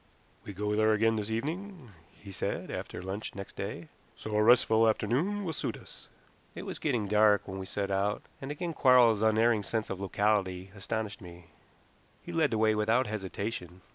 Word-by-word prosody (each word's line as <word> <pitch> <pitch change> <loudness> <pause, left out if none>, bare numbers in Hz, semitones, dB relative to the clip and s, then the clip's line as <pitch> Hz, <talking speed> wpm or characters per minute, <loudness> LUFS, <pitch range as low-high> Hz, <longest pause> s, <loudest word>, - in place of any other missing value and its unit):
"We 100 - -7
go 105 +2 -1
there 110 0 +4
again 115 +1 +2
this 105 0 -3
evening," 155 - -4 0.3
he 100 - -11
said - - -3
after 90 - -6
lunch 95 +3 -5
next 100 0 -8
day; 100 -5 -5 0.3
"so 110 -1 -5
a 105 - +4
restful 115 -1 +5
afternoon 150 - 0
will 165 - -2
suit - - -3
us." - - -14 0.5
It - - -6
was - - -5
getting 110 -4 0
dark 105 0 +4
when 95 +1 -5
we 95 - -6
set 100 0 -3
out, 100 +2 0 0.2
and 135 - -6
again 165 +3 -4
Quarles's 125 -6 +5
unerring 110 0 +3
sense 110 +2 -3
of 95 0 -5
locality 95 -2 0
astonished 110 +2 -4
me. 85 -2 -13 0.7
He - - -7
led 160 -3 +2
the 110 - -1
way 110 0 +3
without 110 +4 +2
hesitation. 100 -3 -5
110 Hz, 180 wpm, -30 LUFS, 100-115 Hz, 0.7 s, restful